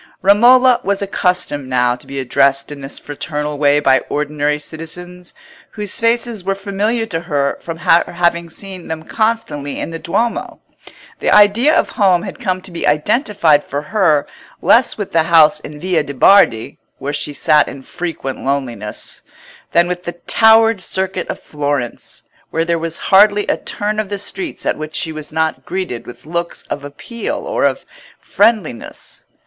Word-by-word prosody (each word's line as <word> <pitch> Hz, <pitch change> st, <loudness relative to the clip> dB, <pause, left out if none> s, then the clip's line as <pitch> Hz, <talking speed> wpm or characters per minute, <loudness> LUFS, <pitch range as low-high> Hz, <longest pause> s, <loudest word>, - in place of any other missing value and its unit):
Romola 245 Hz, +5 st, +6 dB
was 200 Hz, 0 st, -1 dB
accustomed 180 Hz, -8 st, -1 dB
now 125 Hz, -1 st, +2 dB
to 125 Hz, -, -16 dB
be 140 Hz, -, -7 dB
addressed 135 Hz, +2 st, +1 dB
in 145 Hz, -1 st, -8 dB
this 135 Hz, +1 st, -7 dB
fraternal 150 Hz, 0 st, -4 dB
way 145 Hz, 0 st, +4 dB
by 135 Hz, -2 st, +4 dB
ordinary 150 Hz, 0 st, -1 dB
citizens, 175 Hz, +4 st, -8 dB, 0.4 s
whose 210 Hz, -3 st, -3 dB
faces 230 Hz, -2 st, 0 dB
were 195 Hz, +1 st, -1 dB
familiar 205 Hz, +4 st, -1 dB
to 175 Hz, -7 st, -3 dB
her 145 Hz, -5 st, -1 dB
from 165 Hz, -1 st, -6 dB
her 170 Hz, 0 st, +4 dB
having 170 Hz, -1 st, 0 dB
seen 185 Hz, +1 st, -7 dB
them 160 Hz, 0 st, -5 dB
constantly 215 Hz, -12 st, -2 dB
in -, -, -4 dB
the 165 Hz, -, -6 dB
Duomo. 230 Hz, +9 st, -2 dB, 0.6 s
The -, -, 0 dB
idea 230 Hz, +9 st, +5 dB
of -, -, +2 dB
home 185 Hz, -5 st, +2 dB
had -, -, -7 dB
come 185 Hz, 0 st, -2 dB
to 190 Hz, -, -9 dB
be 170 Hz, -, -3 dB
identified 160 Hz, -, +2 dB
for 145 Hz, +2 st, -4 dB
her 160 Hz, -9 st, +3 dB, 0.3 s
less 230 Hz, +8 st, +3 dB
with 205 Hz, -3 st, -5 dB
the 165 Hz, -, +3 dB
house 160 Hz, -3 st, +6 dB
in 150 Hz, -, -9 dB
the -, -, -11 dB
Via 175 Hz, 0 st, 0 dB
de' 140 Hz, -1 st, -7 dB
Bardi, 125 Hz, -, +4 dB, 0.2 s
where 145 Hz, +1 st, -4 dB
she 145 Hz, +1 st, -3 dB
sat 150 Hz, +1 st, +3 dB
in 135 Hz, 0 st, -9 dB
frequent 165 Hz, -5 st, -5 dB
loneliness, 125 Hz, -6 st, -4 dB, 0.5 s
than 170 Hz, +1 st, +4 dB
with 180 Hz, 0 st, -4 dB
the 175 Hz, -, -4 dB
towered 225 Hz, +3 st, +4 dB
circuit 190 Hz, -1 st, -2 dB
of -, -, -5 dB
Florence, 145 Hz, -5 st, -4 dB, 0.3 s
where 165 Hz, 0 st, -1 dB
there 170 Hz, 0 st, 0 dB
was 165 Hz, 0 st, -3 dB, 0.2 s
hardly 205 Hz, +1 st, +6 dB
a -, -, +1 dB
turn 210 Hz, +1 st, -3 dB
of 215 Hz, -3 st, -2 dB
the 205 Hz, -, -3 dB
streets 320 Hz, -, -6 dB
at -, -, -1 dB
which 155 Hz, 0 st, -6 dB
she 165 Hz, -, 0 dB
was 155 Hz, -1 st, -7 dB
not 160 Hz, 0 st, -1 dB
greeted 185 Hz, -11 st, -4 dB
with 120 Hz, -, -12 dB
looks 170 Hz, +2 st, -4 dB
of 145 Hz, -, -3 dB
appeal 145 Hz, +11 st, -6 dB
or -, -, 0 dB
of -, -, -1 dB, 0.3 s
friendliness. 215 Hz, -, -1 dB
170 Hz, 170 wpm, -17 LUFS, 145-200 Hz, 0.6 s, Romola